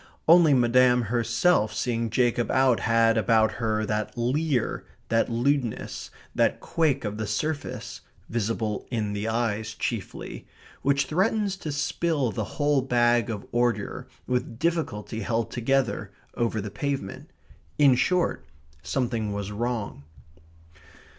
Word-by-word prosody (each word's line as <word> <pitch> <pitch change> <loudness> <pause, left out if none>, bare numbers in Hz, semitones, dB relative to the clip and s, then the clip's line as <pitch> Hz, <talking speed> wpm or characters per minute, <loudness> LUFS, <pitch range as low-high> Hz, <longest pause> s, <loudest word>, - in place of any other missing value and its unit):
Only 165 -3 +7
Madame 125 0 +4
herself 115 0 +2
seeing 115 0 -1
Jacob 120 +1 +1
out 130 -3 +3
had 115 0 +3
about 110 +1 +3
her 110 -1 0
that 105 +2 -3
leer, 130 +2 0 0.3
that 115 +2 +2
lewdness, 120 0 -1 0.2
that - - +2
quake 145 -6 0
of 105 +1 -4
the 110 - -2
surface 145 +8 -3 0.3
(visible 110 -2 -2
in 110 -4 -2
the 105 +2 -3
eyes 110 -1 -1
chiefly), 115 -3 -5 0.3
which 140 +1 +2
threatens 195 +5 +1
to 155 -5 -5
spill 145 -2 0
the - - -2
whole 145 -2 +3
bag 120 -2 +2
of 105 -3 -4
ordure, 120 -4 -1 0.2
with 125 -2 -2
difficulty 150 -9 -2
held 115 +1 -1
together, 135 +2 0 0.2
over 115 -2 -1
the 105 0 -6
pavement. 140 +1 -4 0.5
In 140 -3 +6
short, 155 - +1 0.3
something 120 -5 -1
was 100 0 -4
wrong. 110 -8 -3
120 Hz, 125 wpm, -26 LUFS, 110-140 Hz, 0.5 s, Only